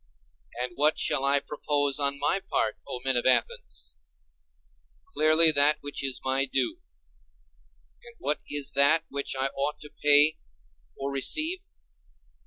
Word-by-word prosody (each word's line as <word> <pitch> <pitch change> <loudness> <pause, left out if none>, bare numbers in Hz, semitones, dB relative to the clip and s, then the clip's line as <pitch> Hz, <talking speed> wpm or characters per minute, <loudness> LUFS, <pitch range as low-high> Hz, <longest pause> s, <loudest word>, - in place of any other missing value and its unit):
And 125 - -4
what 150 +2 +2
shall 135 - 0
I 140 +1 +2
propose 145 -1 -2
on 140 0 0
my 185 - -1
part, 110 - -2
O 125 - -7
men 130 -1 0
of 120 - -1
Athens? - - -3 1.1
Clearly 155 +2 +5
that 145 +1 +5
which 145 -1 -6
is 135 -2 -1
my 135 +1 +1
due. 130 -2 -3 1.2
And 235 0 -16
what 150 +2 -2
is 145 -1 -3
that 140 +4 +4
which 140 -1 -4
I 135 +1 -2
ought 140 +2 -5
to 150 - -12
pay 150 +1 +5 0.6
or 135 0 -5
to - - -8
receive? 310 - +1
140 Hz, 145 wpm, -25 LUFS, 135-150 Hz, 1.2 s, Clearly